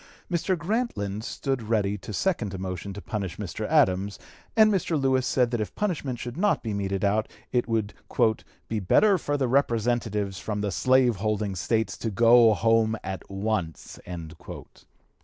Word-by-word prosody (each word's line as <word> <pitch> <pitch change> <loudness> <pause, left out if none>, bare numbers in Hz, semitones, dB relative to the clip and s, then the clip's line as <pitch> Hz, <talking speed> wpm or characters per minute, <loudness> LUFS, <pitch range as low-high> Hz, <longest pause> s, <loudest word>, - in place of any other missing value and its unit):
Mr. 175 +2 0
Grantland 165 - -2
stood 135 +1 -2
ready 105 -2 0
to 105 +2 -8
second 105 - -1
a - - -4
motion 95 +1 -5
to 100 +1 -8
punish 100 -6 -4
Mr. 105 +1 -4
Adams, 100 -10 +2 0.4
and 215 -1 +6
Mr. 170 -5 0
Lewis 130 -2 +2
said 125 -2 +2
that 120 -3 -1
if 105 - -5
punishment 160 -11 -2
should 120 +2 -6
not 205 +3 +1
be 110 -3 -3
meted 100 0 -1
out 105 +2 +1 0.2
it 120 -1 +1
would 110 -3 -1 0.7
"be 110 - -2
better 190 - +4
for 145 -1 -1
the 135 -2 0
representatives 115 -6 0
from 105 -1 -3
the 100 -1 -1
slave 125 +5 +3
holding 105 -1 -1
States 110 +5 0
to 115 - -3
go 115 +1 +6
home 115 0 +2
at 95 0 -4
once." 95 -5 -3
110 Hz, 160 wpm, -26 LUFS, 100-130 Hz, 0.7 s, and